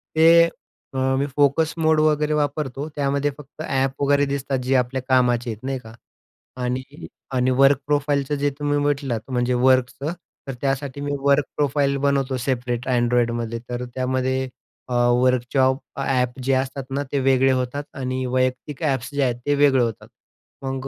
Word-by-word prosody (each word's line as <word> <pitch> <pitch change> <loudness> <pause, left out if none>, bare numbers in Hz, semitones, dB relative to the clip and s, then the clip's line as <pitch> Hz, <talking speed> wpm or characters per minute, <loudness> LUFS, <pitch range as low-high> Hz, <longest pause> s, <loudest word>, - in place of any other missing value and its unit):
ते 170 +1 +6 0.5
मी 130 +1 +1
फोकस 145 +2 +2
मोड 160 -1 +3
वगैरे 150 0 +2
वापरतो. 145 -1 -2
त्यामध्ये 140 0 0
फक्त 150 +1 -12
ॲप 135 -3 -1
वगैरे 145 0 +3
दिसतात 140 -1 -2
जे 130 +2 +1
आपल्या 130 +1 0
कामाचे 125 -2 +2
आहेत 110 +1 -9
नाही 135 0 -2
का. 110 -2 -13 0.7
आणि 125 +1 -1 0.5
आणि 130 0 +2
वर्क 135 +2 +5
प्रोफाइलचं 145 -1 +1
जे 145 0 +1
तुम्ही 145 0 0
म्हटलात 140 -4 -2
म्हणजे 125 0 +1
वर्कचं 130 +4 +2 0.3
तर 135 - -3
त्यासाठी 135 0 -2
मी 145 0 -2
वर्क 140 0 +3
प्रोफाईल 140 -1 +1
बनवतो 135 -2 +1
सेपरेट 125 -1 -2
Androidमध्ये. 120 -1 0
तर 125 0 -3
त्यामध्ये 130 0 -1 0.7
वर्कशॉप 130 +1 +2 0.2
ॲप 130 -1 0
जे 135 - +1
असतात 135 +1 -1
ना 140 +2 -1
ते 140 - +1
वेगळे 135 0 +3
होतात 130 +2 -1
आणि 130 -1 -2
वैयक्तिक 130 +4 -1
ॲप्स 130 -5 0
जे 145 - +1
आहेत 125 -2 +1
ते 145 0 +2
वेगळे 140 -3 +4
होतात. 115 -3 -4 0.6
मग 135 0 -3
135 Hz, 150 wpm, -22 LUFS, 130-145 Hz, 0.7 s, ते